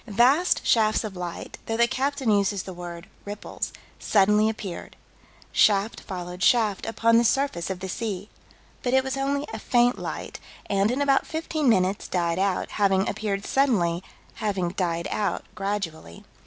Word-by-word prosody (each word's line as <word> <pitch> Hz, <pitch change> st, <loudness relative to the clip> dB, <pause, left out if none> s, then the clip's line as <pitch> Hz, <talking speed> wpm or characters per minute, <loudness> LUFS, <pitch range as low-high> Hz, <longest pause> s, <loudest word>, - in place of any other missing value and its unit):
Vast 255 Hz, -, +3 dB
shafts 215 Hz, -1 st, +3 dB
of 210 Hz, -3 st, -6 dB
light 175 Hz, -1 st, -6 dB
though 225 Hz, -, -1 dB
the 235 Hz, -, +5 dB
captain 270 Hz, -2 st, 0 dB
uses 200 Hz, -1 st, +1 dB
the 190 Hz, -, -7 dB
word 175 Hz, 0 st, -8 dB, 0.2 s
"ripples" 205 Hz, 0 st, -5 dB, 0.3 s
suddenly 210 Hz, +1 st, +4 dB
appeared. 200 Hz, -5 st, -6 dB, 0.6 s
Shaft 205 Hz, +1 st, +3 dB
followed 180 Hz, -2 st, -7 dB
shaft, 215 Hz, -3 st, +3 dB
upon 230 Hz, 0 st, +3 dB
the -, -, +3 dB
surface 235 Hz, -8 st, +1 dB
of 185 Hz, -1 st, -4 dB
the 190 Hz, -, -4 dB
sea. 200 Hz, 0 st, -4 dB, 0.5 s
But 250 Hz, +1 st, +1 dB
it 265 Hz, -, +4 dB
was 265 Hz, 0 st, -2 dB
only 280 Hz, +1 st, -1 dB
a 220 Hz, -, -4 dB
faint 245 Hz, +2 st, +2 dB
light, -, -, -6 dB, 0.3 s
and, 200 Hz, +1 st, +1 dB
in 265 Hz, +4 st, +1 dB
about 275 Hz, -1 st, +2 dB
fifteen 315 Hz, -3 st, -1 dB
minutes, 190 Hz, -2 st, +2 dB
died 170 Hz, -1 st, 0 dB
out: 195 Hz, -1 st, 0 dB
having 195 Hz, -1 st, +3 dB
appeared 200 Hz, -2 st, -2 dB
suddenly, 190 Hz, -11 st, +2 dB, 0.3 s
having 195 Hz, -5 st, -1 dB
died 170 Hz, -2 st, -2 dB
out 205 Hz, -2 st, -1 dB
gradually. 185 Hz, -, -4 dB
205 Hz, 155 wpm, -25 LUFS, 185-240 Hz, 0.6 s, the